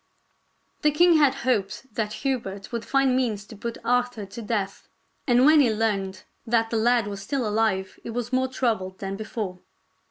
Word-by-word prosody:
Ill - - -44
The 300 -1 +2
king 345 -1 +6
had 285 -3 +4
hoped 215 0 -1
that 210 -1 -2
Hubert 200 -7 -2
would 235 -1 -3
find 270 -1 +2
means 220 -6 0
to 220 - -12
put 230 +3 -5
Arthur 245 -3 0
to 215 +5 -9
death, 205 -3 -3 0.4
and 245 0 +5
when 305 +1 +7
he 255 -6 +4
learned 200 -4 -1 0.2
that 225 -1 +2
the 230 - +1
lad 235 0 +3
was 200 -1 -5
still 250 +3 -2
alive 210 -3 0
he - - -8
was 240 +1 -4
more 260 0 +2
troubled 220 -8 -1
than 195 0 -4
be 215 +2 -6
fore. 195 -5 -4
225 Hz, 190 wpm, -25 LUFS, 200-255 Hz, 0.4 s, when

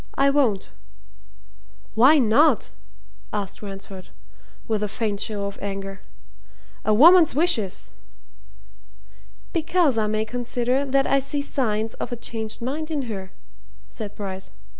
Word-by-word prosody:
"I 275 0 +4
won't!" 225 - +1 1.2
"Why 260 +8 +6
not?" 260 +1 +3 0.6
asked 205 -2 -4
Ransford, 195 -2 -9 0.6
with 220 -3 0
a 210 - 0
faint 205 -1 -2
show 205 -1 -3
of 200 0 -6
anger. 195 -1 -5 0.8
"A 215 - +1
woman's 320 +7 +7
wishes!" 265 - +1 1.6
"Because 330 - +2
I 215 - +1
may 215 +1 0
consider 245 +3 -1
that 275 0 +2
I 275 - +3
see 285 +1 -3
signs 225 -6 -1
of - - -6
a - - -2
changed 225 -1 -4
mind 305 +5 -3
in 300 -3 -2
her," 195 -5 -6 0.6
said 210 -2 -7
Bryce. 190 -2 -6
225 Hz, 125 wpm, -23 LUFS, 205-275 Hz, 1.6 s, woman's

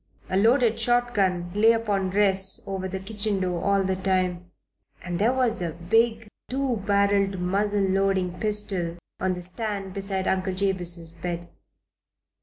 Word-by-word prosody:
A - - +1
loaded 230 +2 +4
shotgun 210 -7 +1
lay 220 +3 +5
upon 205 -4 0
rests 195 -1 +1
over 190 -1 -3
the 190 +1 -4
kitchen 205 0 -2
door 180 -2 -1
all 200 -1 +3
the 190 0 0
time, 185 -2 -1 0.5
and 175 -1 -3
there 220 +4 +4
was 250 -5 0
a 170 -2 -2
big, 225 +6 +1 0.2
two 265 -2 0
barreled, 200 -1 +2
muzzle 200 +3 0
loading 190 -2 +1
pistol 200 -5 -1 0.2
on 190 0 +1
the 180 - -6
stand 195 0 -3
beside 195 -1 -3
Uncle 185 0 0
Jabez's 175 -4 -1
bed. 175 0 -5
195 Hz, 145 wpm, -25 LUFS, 185-210 Hz, 0.5 s, lay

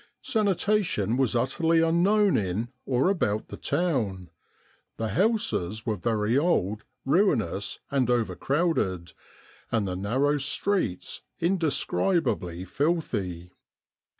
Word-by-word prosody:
" - - -56
Sanitation 200 - +1
was 130 -2 +1
utterly 160 +7 +2
unknown 185 +5 +3
in 100 +4 -1 0.2
or 130 +4 +2
about 110 - -1
the - - -6
town. 110 - -1 0.7
The 110 -1 -2
houses 110 - 0
were 110 -3 0
very 110 +2 0
old, 110 - +1 0.2
ruinous 130 - +1
and 130 -3 +1
over 120 -2 +1
crowded, 135 - 0 0.6
and 110 -4 +1
the 90 - -3
narrow 130 +10 +1
streets 140 - -1 0.2
indescribably 165 - 0
filthy." 100 - -2
125 Hz, 105 wpm, -27 LUFS, 100-170 Hz, 0.7 s, unknown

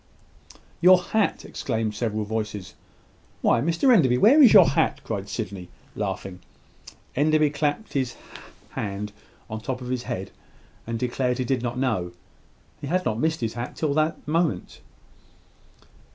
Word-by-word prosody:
"Your 180 +1 +7
hat!" 215 +3 -1
exclaimed 110 -1 -2
several 110 -1 -2
voices. 105 -3 -4 0.7
"Why, 115 - +3
Mr 170 - +3
Enderby, 130 - +4
where 260 - +6
is 250 -7 +8
your 195 -5 +8
hat?" - - +1
cried - - -4
Sydney, 90 -1 -5 0.3
laughing. 95 -2 -4 0.8
Enderby 155 +1 +3
clapped 150 +8 -2
his 130 -3 -1 0.6
hand 100 0 -4 0.4
on 110 0 -5
the - - -18
top 130 -2 -2
of 125 -1 -7
his 125 -1 -1
head, 95 +1 -4 0.6
and 115 0 -2
declared 125 +1 -1
he 130 - -1
did 130 0 0
not 120 0 -3
know. 110 -10 -1 0.7
He 145 - -6
had 185 +4 0
not 110 - -1
missed 160 +1 0
his 115 -1 -2
hat 120 +1 -5
till 150 -3 -1
this 155 +2 +1
moment. 155 - -1
125 Hz, 150 wpm, -25 LUFS, 110-155 Hz, 0.8 s, is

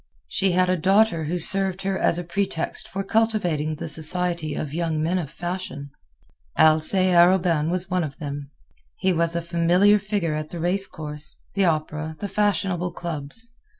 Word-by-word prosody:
She 185 - 0
had 185 +1 +3
a 185 0 +1
daughter 185 -1 +3
who 170 +4 -2
served 195 +2 +1
her 195 0 -1
as 170 - +2
a 175 - -3
pretext 175 -1 -2
for 195 +1 -4
cultivating 195 -8 0
the 155 - -6
society 160 -1 0
of 150 -2 -4
young 165 -1 -1
men 170 +4 0
of 155 -6 -5
fashion. 175 -4 -6 0.7
Alcée 160 +4 +4
Arobin 170 -3 +4
was 180 +1 -2
one 180 -1 +1
of 140 -3 -6
them. 145 -3 -6 0.5
He 190 - +1
was 170 0 0
a 170 - -1
familiar 175 +5 +3
figure 195 -6 -2
at 155 0 -4
the 175 - -6
race 185 +4 +1
course, 150 -1 -3 0.2
the 195 -1 +2
opera, 155 -1 -1
the 205 - -4
fashionable 195 -3 0
clubs. 170 +7 -2
175 Hz, 170 wpm, -23 LUFS, 155-190 Hz, 0.7 s, Alcée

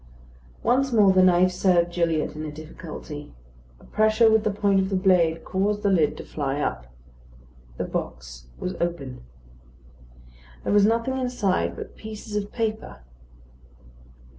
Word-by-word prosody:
Once 265 +3 +2
more 210 -4 +5
the 185 - +5
knife 185 0 +5
served 175 -2 +2
Gilliatt 165 -3 0
in 155 - -5
a 155 - -5
difficulty. 155 - -9 0.4
A - - -20
pressure 215 +1 +3
with 220 -1 +3
the 215 - +1
point 200 -1 +2
of 190 0 0
the 195 - -1
blade 175 -4 +2
caused 205 +2 -1
the 200 - +3
lid 160 -6 +2
to - - -7
fly 140 -1 -3
up. - - -3 0.9
The - - -2
box 60 -1 -6
was 185 - -4
open. 170 -7 -3 1.4
There - - 0
was 205 0 +5
nothing 230 +4 0
inside 195 - 0
but - - -9
pieces 215 0 -8
of 205 0 -2
paper. 215 - -4
185 Hz, 145 wpm, -24 LUFS, 155-210 Hz, 1.4 s, more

